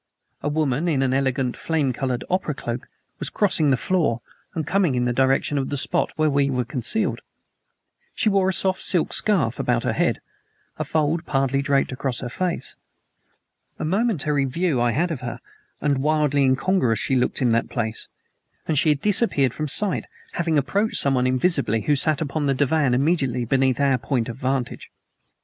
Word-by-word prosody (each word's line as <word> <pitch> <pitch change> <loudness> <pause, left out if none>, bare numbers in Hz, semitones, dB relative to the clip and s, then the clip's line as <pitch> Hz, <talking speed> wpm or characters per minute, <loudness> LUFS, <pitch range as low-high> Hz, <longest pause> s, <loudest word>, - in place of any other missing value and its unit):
A 145 - -1
woman 150 0 0
in 140 -5 +1
an 130 -1 +1
elegant, 130 -2 0
flame 150 -6 -1
colored 125 -1 -2
opera 180 -5 -1
cloak 120 0 -5 0.3
was - - -3
crossing 175 -7 +1
the 130 - +3
floor 160 -8 0 0.4
and 160 -2 -2
coming 180 -4 +1
in 125 0 +1
the 120 - 0
direction 135 +3 +1
of 135 - -3
the 145 - -2
spot - - 0
where 155 0 +2
we 140 -1 +2
were 125 -2 -1
concealed. 130 - -1 0.9
She - - 0
wore 195 -2 +3
a - - 0
soft 190 0 +1
silk 175 -4 +3
scarf 150 - +1
about 120 -1 0
her - - 0
head, - - 0 0.6
a - - 0
fold 160 +2 -1
partly 135 -1 +1
draped 140 -1 +1
across 130 -1 -2
her 125 - -4
face. 180 +7 -2 1.0
A - - -4
momentary 155 - +1
view 150 -1 0
I 120 - +3
had 160 +9 0
of 150 - -4
her 120 -1 -5 0.4
and 140 -2 +1
wildly 150 -1 +2
incongruous 130 - +2
she 135 - -2
looked 125 -1 +1
in 125 -3 +2
that 115 +1 +1
place 115 -3 -3 0.6
and 155 -3 +2
she 155 - +2
had 145 -2 +1
disappeared 200 - +2
from 155 - -3
sight, 195 +7 +1 0.3
having 165 -2 0
approached 200 - 0
someone 130 -2 +2
invisible 130 - +1
who 145 +6 +1
sat 155 +3 +1
upon 150 -1 -2
the 135 - +2
divan 140 -1 +2
immediately 135 -4 +1
beneath 130 +1 +1
our 135 -3 +2
point 120 -1 -1
of 115 - -5
vantage. 130 -1 -3
140 Hz, 180 wpm, -23 LUFS, 130-160 Hz, 1.0 s, the